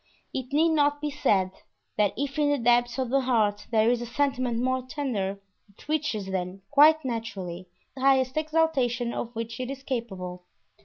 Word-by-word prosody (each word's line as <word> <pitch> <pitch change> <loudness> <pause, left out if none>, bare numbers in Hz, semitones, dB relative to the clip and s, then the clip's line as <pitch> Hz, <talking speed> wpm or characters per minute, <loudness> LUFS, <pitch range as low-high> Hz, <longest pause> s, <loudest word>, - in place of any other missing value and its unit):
It 260 0 -4
need 315 +4 +4
not 290 -2 +2
be 295 0 -3
said 195 -10 +1 0.4
that 205 -2 +2
if 280 +1 -2
in 295 -1 +3
the 290 - +2
depths 240 -1 +2
of 255 -2 -2
the 275 0 +3
heart 215 -5 +1
there 225 0 +3
is 245 -1 0
a 240 - -5
sentiment 255 -2 0
more 255 +2 0
tender, 245 -8 -3 0.3
it 200 - -19
reaches 295 -10 -1
then, 185 +1 -4
quite 305 +1 +6
naturally, 195 -7 -5 0.2
the 265 - -9
highest 265 -1 +3
exaltation 305 -7 +1
of 240 0 -5
which 230 +1 -5
it 255 0 -3
is 275 0 -6
capable. 190 -9 -5
245 Hz, 175 wpm, -27 LUFS, 220-280 Hz, 0.4 s, quite